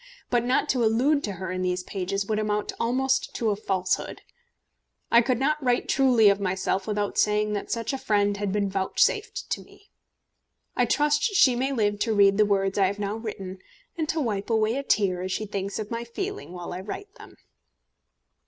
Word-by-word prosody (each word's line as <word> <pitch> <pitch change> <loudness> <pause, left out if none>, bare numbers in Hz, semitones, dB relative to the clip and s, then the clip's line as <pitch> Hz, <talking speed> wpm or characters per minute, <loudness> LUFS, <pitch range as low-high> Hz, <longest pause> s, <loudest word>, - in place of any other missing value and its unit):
But 240 -1 +2
not 250 +2 +1
to 250 -3 +2
allude 260 +7 +2
to 205 - -4
her 185 +1 -5
in 185 0 -3
these 180 0 -1
pages 195 +1 -3
would 215 +1 -1
amount 210 -1 -1
almost 260 +3 0
to 225 -2 0
a - - 0
falsehood. 190 -3 -2 0.9
I 235 - +7
could 250 0 0
not 300 +3 0
write 245 -1 +1
truly 250 -5 +4
of 200 0 +4
myself 190 0 -1
without 205 -1 -1
saying 210 0 +2
that 205 - -4
such 230 +3 -2
a 270 - -3
friend 205 -3 +1
had 205 -1 -2
been 205 0 0
vouchsafed 200 - 0
to - - -1
me. 405 - -20 0.8
I - - +3
trust 295 0 +2
she 390 - +4
may 260 +3 0
live 205 -5 0
to 220 0 0
read 200 -1 +5
the 210 - +6
words 195 0 +1
I 195 - +5
have 200 +2 -3
now 205 0 -2
written, 195 -4 -6 0.4
and 320 -3 -3
to 325 - 0
wipe 210 -7 -2
away 220 0 +2
a 275 - -1
tear 195 -9 +1
as 185 +1 -4
she 215 +3 -2
thinks 200 -1 -4
of 215 0 -5
my 230 0 -3
feeling 385 - -5
while 175 -1 -7
I 180 - -5
write 390 - -7
them. - - -13
210 Hz, 200 wpm, -26 LUFS, 195-250 Hz, 0.9 s, I